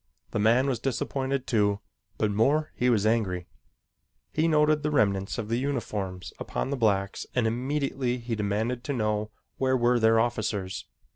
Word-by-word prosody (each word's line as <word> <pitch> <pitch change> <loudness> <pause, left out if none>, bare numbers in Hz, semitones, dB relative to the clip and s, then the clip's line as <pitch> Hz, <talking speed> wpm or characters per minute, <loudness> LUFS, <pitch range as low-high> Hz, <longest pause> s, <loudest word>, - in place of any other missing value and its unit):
The - - -1
man 115 +5 +4
was 130 -5 0
disappointed, 135 +1 -1
too, 105 -4 +2 0.4
but 105 -1 +1
more 140 +9 +2
was 120 -5 +3
he - - +3
angry. 90 -6 -1 0.9
He 155 +1 +2
noted 150 -1 +3
the 150 - 0
remnants 100 -8 +1
of 110 - -3
the 115 +2 0
uniforms 105 -9 -3
upon 135 - -3
the - - +1
blacks 100 -5 0
and 125 -3 +2
immediately 130 +1 -1
he 120 -1 -5
demanded 110 +4 -1
to 140 - -1
know 105 -3 0 0.3
where 130 0 +2
were 120 0 +3
their 110 0 +5
officers. 110 -5 -1
115 Hz, 160 wpm, -27 LUFS, 105-130 Hz, 0.9 s, their